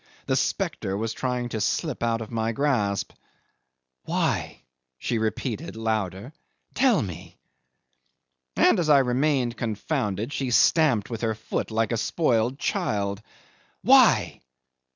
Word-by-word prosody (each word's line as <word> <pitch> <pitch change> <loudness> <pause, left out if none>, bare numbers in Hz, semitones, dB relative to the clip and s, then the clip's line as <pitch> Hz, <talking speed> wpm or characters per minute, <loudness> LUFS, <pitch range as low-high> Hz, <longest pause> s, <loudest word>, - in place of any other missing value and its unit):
The - - 0
spectre 95 +1 -1
was 110 +1 -2
trying 125 -1 -2
to 110 -2 -3
slip 155 +3 -1
out 115 -1 0
of 110 - -7
my 115 0 -1
grasp. 110 -8 0 0.9
"Why?" - - -1 0.3
she 115 - -2
repeated 115 +7 -3
louder; 110 - -3 0.4
"tell 250 - +3
me!" 90 -5 -9 1.2
And 205 - +4
as 165 -3 0
I 145 - +7
remained 130 -2 +1
confounded, 115 - -2
she 135 -2 -2
stamped 125 -3 +3
with 115 - -4
her 110 -2 0
foot 110 - -4
like 110 -1 0
a 115 - 0
spoilt 120 0 +1
child. 105 - -1 0.6
"Why? - - +5
115 Hz, 125 wpm, -25 LUFS, 110-135 Hz, 1.2 s, I